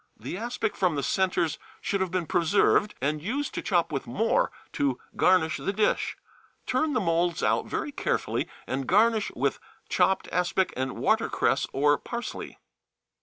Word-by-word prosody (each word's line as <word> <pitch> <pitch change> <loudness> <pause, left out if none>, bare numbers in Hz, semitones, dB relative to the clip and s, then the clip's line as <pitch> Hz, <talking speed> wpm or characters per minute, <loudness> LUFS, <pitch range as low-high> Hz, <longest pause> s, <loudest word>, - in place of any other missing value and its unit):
The - - -5
aspic 225 +1 -2
from 180 -5 +1
the 140 - -1
centres 180 -2 +1 0.2
should 200 -1 -1
have 190 - 0
been 180 -1 -1
preserved 190 +5 +3
and 150 +2 0
used 260 - -2
to - - -3
chop 175 -7 +1
with 135 -3 -3
more 220 - +1 0.2
to 135 -3 0 0.2
garnish 180 -4 +3
the - - -2
dish. 210 +1 0 0.5
Turn 315 -2 +1
the 250 - +2
moulds 170 -2 +1
out - - +2
very 295 - -3
carefully, - - -1 0.2
and 135 0 -3
garnish 220 +2 +3
with - - 0 0.3
chopped 190 - +2
aspic 180 +1 +1
and 130 0 -2
watercress - - +1
or 145 +1 +3
parsley. 235 -1 -6
185 Hz, 155 wpm, -27 LUFS, 155-215 Hz, 0.5 s, preserved